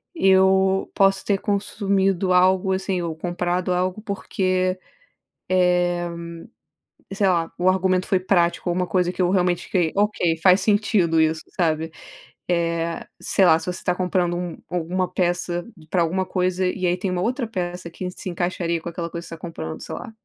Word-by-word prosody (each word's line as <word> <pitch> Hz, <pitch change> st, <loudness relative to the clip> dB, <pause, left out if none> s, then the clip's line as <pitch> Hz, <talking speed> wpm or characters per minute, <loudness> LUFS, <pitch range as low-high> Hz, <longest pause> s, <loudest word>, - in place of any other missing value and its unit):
Eu 190 Hz, -, +3 dB
posso 195 Hz, -1 st, +3 dB
ter 200 Hz, -1 st, +1 dB
consumido 195 Hz, -2 st, 0 dB
algo, 185 Hz, +1 st, +4 dB
assim, 190 Hz, -1 st, -1 dB
ou 165 Hz, -2 st, -3 dB
comprado 175 Hz, +1 st, -1 dB
algo 185 Hz, +2 st, -1 dB
porque, 185 Hz, -3 st, -1 dB, 0.7 s
eh 180 Hz, -1 st, +2 dB, 1.0 s
sei 195 Hz, 0 st, +1 dB
lá, 170 Hz, -3 st, +1 dB
o 180 Hz, -, 0 dB
argumento 185 Hz, 0 st, +2 dB
foi 190 Hz, -, +2 dB
prático, 175 Hz, -1 st, +1 dB
ou 175 Hz, -, 0 dB
uma 180 Hz, 0 st, 0 dB
coisa 180 Hz, +1 st, +1 dB
que 185 Hz, -, -3 dB
eu 175 Hz, -, +3 dB
realmente 180 Hz, -2 st, +1 dB
fiquei: 175 Hz, -4 st, +1 dB
"Ok, 200 Hz, -5 st, +1 dB
faz 185 Hz, +2 st, +5 dB
sentido, 205 Hz, -5 st, +2 dB
isso", 160 Hz, 0 st, +1 dB, 0.2 s
sabe. 160 Hz, -1 st, +1 dB, 0.6 s
Eh 170 Hz, -1 st, -1 dB, 0.2 s
sei 195 Hz, -, +3 dB
lá, 160 Hz, -2 st, +6 dB
se -, -, -7 dB
você 180 Hz, 0 st, -3 dB
está 180 Hz, -, 0 dB
comprando 180 Hz, -1 st, 0 dB
um 175 Hz, -1 st, -4 dB
alguma 180 Hz, +1 st, -1 dB
peça 175 Hz, -1 st, -1 dB, 0.3 s
para 180 Hz, -, +2 dB
alguma 185 Hz, +3 st, 0 dB
coisa, 185 Hz, 0 st, 0 dB
e 185 Hz, 0 st, -2 dB
aí 175 Hz, +1 st, +1 dB
tem 190 Hz, +1 st, -2 dB
uma 180 Hz, -1 st, -1 dB
outra 245 Hz, +5 st, -1 dB
peça 180 Hz, -4 st, -4 dB
que 180 Hz, +2 st, -5 dB
se 185 Hz, -, -7 dB
encaixaria 175 Hz, -1 st, -2 dB
com 170 Hz, -, -5 dB
aquela 170 Hz, 0 st, -5 dB
coisa 170 Hz, 0 st, -6 dB
que -, -, -11 dB
você 165 Hz, -, -6 dB
está 160 Hz, -, -18 dB
comprando, 80 Hz, -, -6 dB
sei -, -, -7 dB
lá. 245 Hz, -, -8 dB
180 Hz, 180 wpm, -23 LUFS, 175-190 Hz, 1.0 s, lá